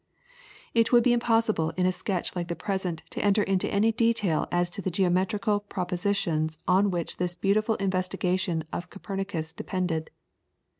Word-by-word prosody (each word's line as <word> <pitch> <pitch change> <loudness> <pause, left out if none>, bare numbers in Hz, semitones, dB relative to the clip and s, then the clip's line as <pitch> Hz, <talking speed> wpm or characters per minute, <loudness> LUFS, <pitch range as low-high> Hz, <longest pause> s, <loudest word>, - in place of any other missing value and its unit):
] - - -23
It 230 0 +3
would 240 -1 +6
be 245 - +4
impossible 225 -8 +2
in 180 - +2
a 185 - +4
sketch 185 0 -3
like 175 -1 -2
the 170 - -3
present 185 -5 -3
to - - -3
enter 205 0 +4
into 195 -2 0
any 210 +3 +3
detail 225 -8 +1
as 175 0 +2
to 200 - -6
the 190 - -1
geometrical 190 +3 +1
propositions 180 -5 -1
on 190 +3 +4
which 175 -3 -2
this 175 -1 -1
beautiful 215 +4 +1
investigation 185 -3 -1
of 175 +1 -4
Copernicus 195 -5 -4
depended. 180 -4 -2
190 Hz, 160 wpm, -27 LUFS, 175-205 Hz, -, would